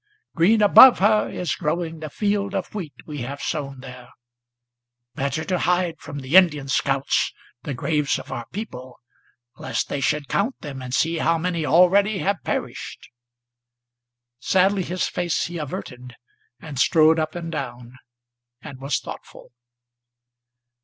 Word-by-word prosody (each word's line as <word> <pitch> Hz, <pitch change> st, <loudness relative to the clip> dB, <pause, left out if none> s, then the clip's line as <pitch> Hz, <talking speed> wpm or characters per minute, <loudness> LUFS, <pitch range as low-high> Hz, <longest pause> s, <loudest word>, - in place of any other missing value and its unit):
Green 210 Hz, +6 st, +3 dB
above 225 Hz, +5 st, +9 dB
her 210 Hz, +2 st, +3 dB
is 175 Hz, -5 st, -3 dB
growing 165 Hz, 0 st, -3 dB
the 155 Hz, -1 st, -6 dB
field 200 Hz, +2 st, -1 dB
of 190 Hz, -2 st, -4 dB
wheat 180 Hz, -9 st, -6 dB
we 150 Hz, -2 st, -7 dB
have 135 Hz, +4 st, -5 dB
sown 135 Hz, -4 st, -4 dB
there, 125 Hz, -2 st, -11 dB, 1.0 s
Better 140 Hz, +3 st, -2 dB
to 180 Hz, -2 st, -1 dB
hide 180 Hz, -1 st, 0 dB
from 145 Hz, -, -8 dB
the 135 Hz, +5 st, -2 dB
Indian 155 Hz, -7 st, +5 dB
scouts 135 Hz, +1 st, +1 dB, 0.3 s
the 140 Hz, +1 st, -5 dB
graves 150 Hz, +2 st, 0 dB
of -, -, -10 dB
our 120 Hz, -1 st, -5 dB
people, 130 Hz, -, -8 dB, 0.6 s
Lest -, -, -3 dB
they 140 Hz, -, -3 dB
should 150 Hz, 0 st, 0 dB
count 220 Hz, +7 st, -1 dB
them 140 Hz, -5 st, -7 dB
and 125 Hz, -1 st, -7 dB
see 165 Hz, 0 st, +1 dB
how 165 Hz, +1 st, +2 dB
many 170 Hz, -2 st, -2 dB
already 190 Hz, +7 st, +4 dB
have 200 Hz, +1 st, -1 dB
perished!" -, -, -5 dB, 1.3 s
Sadly 190 Hz, +7 st, +2 dB
his 180 Hz, +1 st, -2 dB
face 175 Hz, -2 st, -1 dB
he 170 Hz, 0 st, -6 dB
averted, 125 Hz, -4 st, -7 dB, 0.4 s
and 145 Hz, -5 st, -7 dB
strode 160 Hz, +2 st, +4 dB
up 155 Hz, +2 st, -2 dB
and 170 Hz, -1 st, -5 dB
down, 125 Hz, -4 st, -7 dB, 0.6 s
and 135 Hz, 0 st, -10 dB
was 135 Hz, -1 st, -1 dB
thoughtful. -, -, -11 dB
160 Hz, 145 wpm, -23 LUFS, 135-180 Hz, 1.3 s, above